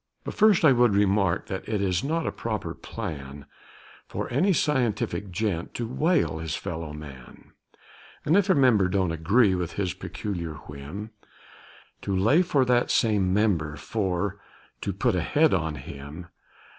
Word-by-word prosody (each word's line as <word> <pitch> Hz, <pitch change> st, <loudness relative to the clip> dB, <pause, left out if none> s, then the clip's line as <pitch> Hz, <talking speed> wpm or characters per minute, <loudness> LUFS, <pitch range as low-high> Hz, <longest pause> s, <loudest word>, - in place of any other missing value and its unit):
But -, -, -5 dB
first 210 Hz, -6 st, +4 dB
I 145 Hz, -, +8 dB
would 120 Hz, -4 st, +4 dB
remark, 100 Hz, -2 st, +2 dB
that 95 Hz, -1 st, -6 dB
it 105 Hz, -2 st, 0 dB
is 95 Hz, +1 st, 0 dB
not 160 Hz, +3 st, -1 dB
a -, -, -1 dB
proper -, -, -4 dB
plan 70 Hz, -2 st, -7 dB, 0.6 s
For -, -, -4 dB
any 180 Hz, +10 st, +3 dB
scientific 120 Hz, -, 0 dB
gent 95 Hz, -3 st, -2 dB
to 120 Hz, -, -2 dB
whale 150 Hz, -, +1 dB
his 80 Hz, -1 st, -3 dB
fellow 80 Hz, -2 st, -5 dB
man, 70 Hz, -5 st, -11 dB, 0.7 s
And, 160 Hz, -, +3 dB
if 200 Hz, 0 st, +3 dB
a 190 Hz, -, +5 dB
member 120 Hz, -9 st, +4 dB
don't 95 Hz, -2 st, 0 dB
agree 95 Hz, +7 st, +3 dB
with 90 Hz, -2 st, -2 dB
his 95 Hz, -3 st, -2 dB
peculiar 85 Hz, -6 st, -5 dB
whim, 75 Hz, +10 st, -8 dB, 0.9 s
To 100 Hz, -, -2 dB
lay 115 Hz, -, +4 dB
for 145 Hz, -7 st, +2 dB
that 120 Hz, -1 st, +2 dB
same 105 Hz, -5 st, +2 dB
member 90 Hz, -7 st, +1 dB
for 100 Hz, -1 st, -2 dB, 0.4 s
to 100 Hz, -, -2 dB
"put 110 Hz, +5 st, 0 dB
a 90 Hz, -, 0 dB
head" 150 Hz, -, +3 dB
on 80 Hz, -4 st, 0 dB
him. 70 Hz, +5 st, -9 dB
100 Hz, 155 wpm, -26 LUFS, 85-120 Hz, 0.9 s, I